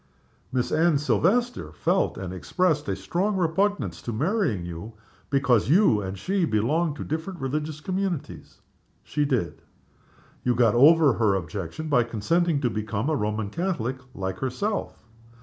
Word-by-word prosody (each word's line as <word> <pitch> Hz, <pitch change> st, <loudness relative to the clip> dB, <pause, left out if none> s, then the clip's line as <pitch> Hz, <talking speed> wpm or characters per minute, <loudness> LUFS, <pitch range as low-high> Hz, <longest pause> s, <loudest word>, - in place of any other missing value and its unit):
"Miss 125 Hz, -1 st, -1 dB
Anne 165 Hz, -1 st, +3 dB
Silvester 235 Hz, -, +1 dB
felt, 180 Hz, +3 st, 0 dB
and 95 Hz, -1 st, -5 dB
expressed, 150 Hz, -, 0 dB
a 95 Hz, -, 0 dB
strong 180 Hz, -, -1 dB
repugnance 165 Hz, -, 0 dB
to 120 Hz, -, -4 dB
marrying 145 Hz, -, 0 dB
you, 85 Hz, +6 st, -7 dB, 0.4 s
because 130 Hz, -5 st, +2 dB
you 155 Hz, -, +4 dB
and 95 Hz, 0 st, -5 dB
she 190 Hz, -, -1 dB
belonged 150 Hz, +6 st, +1 dB
to -, -, -6 dB
different 160 Hz, +4 st, -4 dB
religious 150 Hz, +3 st, -3 dB
communities?" 185 Hz, -3 st, -4 dB, 0.4 s
"She 150 Hz, -, -1 dB
did." 125 Hz, -, -1 dB, 0.8 s
"You 125 Hz, -1 st, +2 dB
got 115 Hz, -3 st, +4 dB
over 150 Hz, +2 st, +6 dB
her 110 Hz, -4 st, +2 dB
objection 95 Hz, -, -5 dB
by 140 Hz, -5 st, +4 dB
consenting 140 Hz, +8 st, 0 dB
to 125 Hz, -, +1 dB
become 110 Hz, +5 st, -2 dB
a -, -, +2 dB
Roman 105 Hz, -3 st, -2 dB
Catholic, 135 Hz, -, -2 dB, 0.2 s
like 95 Hz, -1 st, -4 dB
herself?" 165 Hz, -, -3 dB
140 Hz, 145 wpm, -25 LUFS, 105-170 Hz, 0.8 s, over